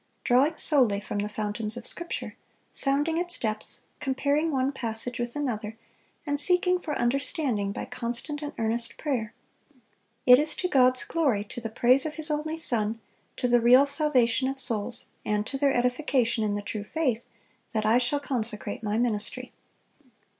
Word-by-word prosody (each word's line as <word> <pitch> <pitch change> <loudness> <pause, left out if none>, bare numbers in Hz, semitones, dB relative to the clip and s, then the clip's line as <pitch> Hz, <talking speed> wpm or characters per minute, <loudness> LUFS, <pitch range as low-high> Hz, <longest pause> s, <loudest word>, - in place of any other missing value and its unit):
drawing 275 +6 +3
solely 245 -9 +3
from 205 0 -5
the 205 +1 -2
fountains 210 +1 -1
of 240 - -7
Scripture, 345 0 -5 0.4
sounding 295 +4 0
its 350 0 -1
depths, 215 -2 -3 0.2
comparing 285 +3 0
one 265 -1 +1
passage 240 -1 -4
with 240 0 -3
another, 225 -6 -3 0.5
and 290 -1 -1
seeking 360 +3 +5
for 305 -4 -4
understanding 240 - 0
by - - -5
constant 245 +6 -4
and 295 -1 -4
earnest 230 +1 -1
prayer. 245 -8 -2 0.9
It 250 0 +8
is 305 +1 +1
to 365 - -1
God's 255 -5 +3
glory, 275 -11 0
to 220 +3 -7
the 225 - -4
praise 250 +5 +4
of 300 - -6
His 315 0 0
only 310 +2 -2
Son, 225 -7 -1 0.4
to 250 - 0
the 240 -1 +4
real 250 +4 +7
salvation 265 -4 +2
of 270 0 -5
souls, 230 -1 -3 0.2
and 210 0 -1
to 270 - -5
their 275 0 +2
edification 250 -2 +1
in 205 -1 0
the 205 - -4
true 210 0 -4
faith, 250 -1 -2 0.4
that 215 -1 -1
I 225 +3 +4
shall 255 +4 0
consecrate 220 -7 -2
my 210 -1 -1
ministry." 225 -3 -1
250 Hz, 165 wpm, -27 LUFS, 220-290 Hz, 0.9 s, It